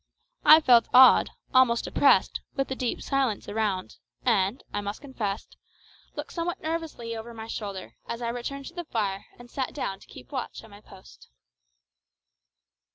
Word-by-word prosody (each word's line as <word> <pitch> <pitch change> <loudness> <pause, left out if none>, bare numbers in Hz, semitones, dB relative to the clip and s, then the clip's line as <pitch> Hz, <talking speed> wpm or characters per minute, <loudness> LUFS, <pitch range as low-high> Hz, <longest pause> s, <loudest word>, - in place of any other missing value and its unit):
I 310 +1 +9
felt 245 -5 +5
awed, 260 +1 +8 0.2
almost 255 -3 +4
oppressed, - - +3
with 270 -1 -1
the 265 - -2
deep 250 -2 -3
silence 270 -6 -1
around, 205 -3 -2 0.3
and, 215 0 +1
I - - -1
must 205 +1 -5
confess, 225 -8 -4 0.7
looked - - -6
somewhat 340 0 -3
nervously 315 -8 -4
over 230 +1 -8
my 220 0 -7
shoulder 200 -4 -6
as 235 - -4
I 235 -1 -2
returned 270 +4 -5
to - - -19
the 350 -1 -6
fire 200 -7 -2
and 245 - -13
sat 260 +1 -4
down 195 -9 -3
to - - -18
keep - - -13
watch 260 -4 -5
at 225 - -15
my 205 +1 -14
post. 190 -2 -16
235 Hz, 160 wpm, -27 LUFS, 205-270 Hz, 0.7 s, I